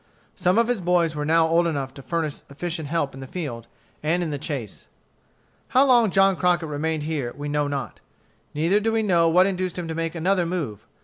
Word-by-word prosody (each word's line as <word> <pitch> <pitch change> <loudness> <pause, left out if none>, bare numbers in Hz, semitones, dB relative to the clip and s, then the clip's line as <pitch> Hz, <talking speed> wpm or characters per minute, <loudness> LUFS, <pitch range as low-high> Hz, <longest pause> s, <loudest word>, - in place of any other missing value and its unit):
Some 180 +3 +1
of 230 0 +4
his 245 -5 0
boys 170 -2 +2
were 150 0 -2
now 160 +1 +4
old 170 +1 +3
enough 140 -5 -3
to 140 - -10
furnish 160 0 -3
efficient 160 +2 -4
help 145 -2 -1
in 135 - -10
the 135 - -8
field 130 -9 -5 0.3
and 170 +4 +1
in 160 - -3
the 145 - -3
chase. 135 -8 -6 0.8
How 260 +2 +4
long 240 -5 +5
John 195 0 +4
Crockett 175 -2 +1
remained 155 +1 -2
here 150 -6 -3
we 145 0 -5
know 145 0 0
not. 140 -1 -4 0.6
Neither 170 +7 +2
do 225 +2 0
we 225 0 +1
know 170 -5 +3
what 180 +3 +5
induced 185 -2 -2
him 175 -2 -4
to 165 - -3
make 165 +1 -3
another 175 +1 +1
move. 130 - -4
165 Hz, 210 wpm, -24 LUFS, 145-180 Hz, 0.8 s, long